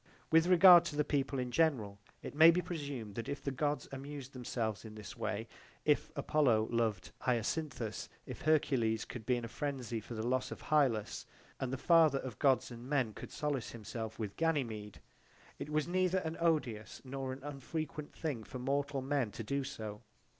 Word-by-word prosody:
/ - - -31
With 165 +1 +6
regard 180 -1 +9
to 155 - -4
the 150 - +2
people 140 -1 0
in 125 -1 -2
general 120 -11 +1 0.2
it - - -6
may 160 +3 +9
be 170 +2 +4
presumed 140 - -5
that 115 +2 -5
if 140 - -4
the 140 - -1
Gods 145 +2 -1
amused 135 0 -7
themselves 115 -5 -3
in 110 -1 -9
this 105 -2 -8
way 110 +2 -3 0.4
if 150 -1 +3
Apollo 135 -7 +2
loved 115 -5 0
Hyacinthus, 120 -1 -1 0.2
if - - -8
Hercules 130 -8 +2
could 115 -3 -8
be 125 - +3
in 120 -1 -3
a - - -4
frenzy 125 -2 -3
for 115 +2 -8
the 110 +1 -3
loss 130 +1 0
of - - -9
Hylas, 130 -9 +2 0.3
and 130 -2 -2
the 135 - -2
father 160 -1 +5
of 130 -6 -6
Gods 135 -2 +3
and 120 +2 -9
men 130 -7 +1
could - - -8
solace 145 -5 -2
himself 110 0 -6
with 105 -3 -4
Ganymede, 120 -11 -1 0.6
it - - -5
was 155 +1 0
neither 185 +1 +2
an 165 -3 -2
odious 150 -10 0
nor 135 0 -4
an 130 +1 -8
unfrequent 145 +1 -5
thing 145 -9 -3
for 130 - -8
mortal 140 +1 -1
men 135 -4 0
to 115 - -5
do 140 +5 -1
so. 110 -6 -6
135 Hz, 190 wpm, -34 LUFS, 115-150 Hz, 0.6 s, regard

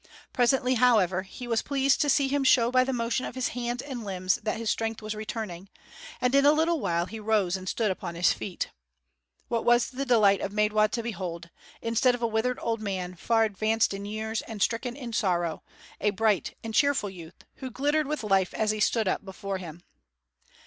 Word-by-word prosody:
Presently, 250 +1 +2
however, 215 -7 +3
he 220 +6 -9
was 230 -2 +1
pleased 275 -1 +1
to 290 - +2
see 280 -1 +3
him 280 +1 0
show 240 -2 +4
by 255 0 +4
the 265 - -2
motion 235 +1 -1
of - - -6
his 255 -1 -1
hands 245 0 -3
and 260 -5 -6
limbs 185 -2 -1
that 215 - -2
his 230 0 -5
strength 225 0 -2
was 215 0 -5
returning; 210 -4 -6 0.5
and 250 +1 +1
in 275 0 +5
a 290 +1 +6
little 325 +1 +1
while 170 -5 0
he 220 +4 -8
rose 210 -4 +1
and 185 -1 -5
stood 220 -4 0
upon 175 -2 -5
his 170 +1 +3
feet. 185 - -5 0.8
What 230 -1 -1
was 240 +1 +3
the 265 +1 -3
delight 215 -6 +4
of 200 - -3
Maidwa 210 0 +3
to 230 +1 -3
behold, 170 -6 -5 0.3
instead 230 +2 +2
of 240 - -7
a - - +3
withered 225 +3 0
old 230 -1 -1
man 185 -3 -3
far 225 +5 +1
advanced 220 +1 +1
in 200 0 -6
years 220 +1 -3
and 220 -2 -8
stricken 235 +4 0
in 245 -5 -7
sorrow, 175 -7 0 0.4
a 210 - +2
bright 210 -1 0
and 225 -1 -5
cheerful 280 -5 +2
youth, 170 -2 -12
who 260 - -6
glittered 290 +4 0
with 300 -4 -3
life 195 -3 +1
as 215 -1 +1
he 215 - -3
stood 215 0 +2
up 185 - 0
before 195 0 -5
him. 170 -1 -9
220 Hz, 205 wpm, -27 LUFS, 195-245 Hz, 0.8 s, a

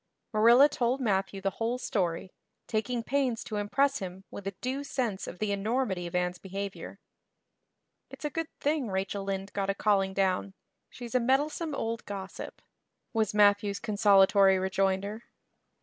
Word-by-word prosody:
Marilla 235 +6 +7
told 255 -2 0
Matthew 195 -4 0
the 195 0 0
whole 235 +2 0
story, 185 -7 -2 0.3
taking 230 +2 -1
pains 255 -3 0
to 215 - -5
impress 275 +7 +1
him 190 -1 -7
with 195 - -7
a 195 - -4
due 265 +4 -3
sense 230 -8 -2
of 175 - -7
the 210 +1 -1
enormity 200 -3 -1
of 170 - -7
Anne's 180 0 0
behavior. 195 +1 -6 1.1
"It's - - -9
a 295 - -1
good 330 +1 -2
thing 295 -3 0
Rachel 195 +1 -2
Lynde 195 0 -4
got 195 -1 -1
a 195 - +1
calling 195 -2 +1
down; 190 0 0 0.3
she's 240 -2 -9
a 255 - +4
meddlesome 290 +5 0
old 230 -2 -3
gossip," 195 -1 -7 0.5
was 220 -3 0
Matthew's 205 -1 +4
consolatory 200 -3 +5
rejoinder. 195 +3 -1
205 Hz, 150 wpm, -29 LUFS, 195-245 Hz, 1.1 s, Marilla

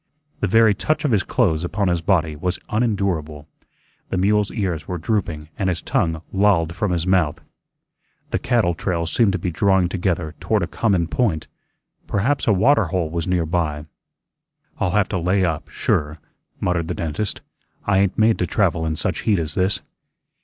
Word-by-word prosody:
The 105 - 0
very 110 +2 +5
touch 155 +9 -1
of 145 - +2
his 105 -3 +3
clothes 85 -11 +1
upon 95 +3 -1
his 85 -2 +1
body 80 -3 +1
was 90 +5 -2
unendurable. 95 -10 -1 0.6
The - - -1
mule's 105 +2 +2
ears 90 -8 -2
were 90 - -3
drooping 85 -4 -2
and 95 - +1
his 90 -2 -2
tongue 80 -1 0
lolled 95 -5 +2
from 105 -1 -1
his 85 -1 0
mouth. 90 -5 +2 0.9
The - - 0
cattle 120 -9 +2
trails 85 -1 -2
seemed 115 -5 +4
to - - 0
be 90 0 -3
drawing 95 +1 +2
together 85 -4 -1
toward - - 0
a - - +1
common 95 -7 +1
point; 90 -5 0 0.6
perhaps 125 +9 0
a - - +5
water 110 +4 +4
hole 85 -1 -2
was 85 0 -2
near 90 -2 +1
by. 75 -3 -1 0.9
"I'll 90 - +1
have 100 +2 +2
to 95 - -1
lay 90 +2 +2
up, 80 -3 -3
sure," 75 +2 -1 0.4
muttered 85 -2 0
the - - -3
dentist. 85 +6 -3 0.4
"I 100 -1 +3
ain't 100 -1 +1
made 110 0 +3
to 90 - 0
travel 85 -4 +1
in 80 - -1
such 90 +2 -2
heat 105 -3 +2
as 80 -3 -2
this." 95 +4 0
90 Hz, 180 wpm, -21 LUFS, 80-100 Hz, 0.9 s, very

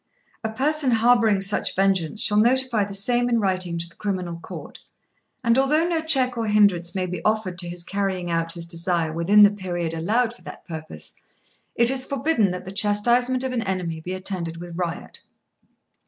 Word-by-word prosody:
"A 220 - -1
person 285 +4 +1
harbouring 230 -3 +3
such 195 +1 -1
vengeance 195 0 +1
shall 210 -1 +3
notify 245 -1 +2
the 200 - -8
same 245 +4 +2
in 235 -1 +2
writing 185 -4 -1
to 170 0 -3
the 165 - -18
Criminal 185 -4 -4
Court; - - -10 0.6
and 235 +1 +3
although 305 +5 +2
no 335 -2 0
check 265 -6 +2
or 225 - -1
hindrance 200 -5 +2
may 185 -1 -1
be 180 0 -6
offered 215 -5 -1
to 175 -2 -1
his 175 0 -5
carrying 190 -2 -2
out 165 0 0
his 170 -1 -4
desire 170 -1 0
within 195 +6 +5
the 205 - +7
period 175 -5 -4
allowed 220 +9 0
for 240 - -20
that - - -11
purpose, 115 - -8 0.6
it 235 +1 +3
is 265 -1 -2
forbidden 275 -6 +1
that 180 0 -6
the 190 - -7
chastisement 240 +6 +1
of 260 - -2
an 245 -2 -1
enemy 185 -5 -3
be 180 +3 -6
attended 185 -3 -4
with 175 0 -9
riot. 175 -1 -5
195 Hz, 185 wpm, -23 LUFS, 175-235 Hz, 0.6 s, the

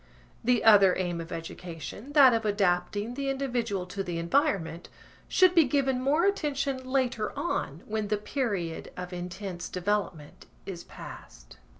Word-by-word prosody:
The 245 +1 +2
other 200 -4 +7
aim 175 -2 -2
of 165 - -9
education 170 - -7
(that 275 -4 +8
of 225 0 +1
adapting 205 +2 0
the 275 +1 -2
individual 240 -8 -1
to 190 +2 -5
the 175 -2 -4
environment) 170 - 0 0.4
should 370 -1 +5
be 335 -4 +6
given 265 -1 +1
more 295 +7 +2
attention 280 -8 0
later 255 -5 0
on 165 - -2
when 215 -1 -2
the 210 +1 +1
period 205 - -3
of 180 0 -6
intense 180 0 -6
development 180 -5 -3 0.2
is 175 -3 -6
past. - - -12
210 Hz, 140 wpm, -28 LUFS, 180-265 Hz, 0.4 s, that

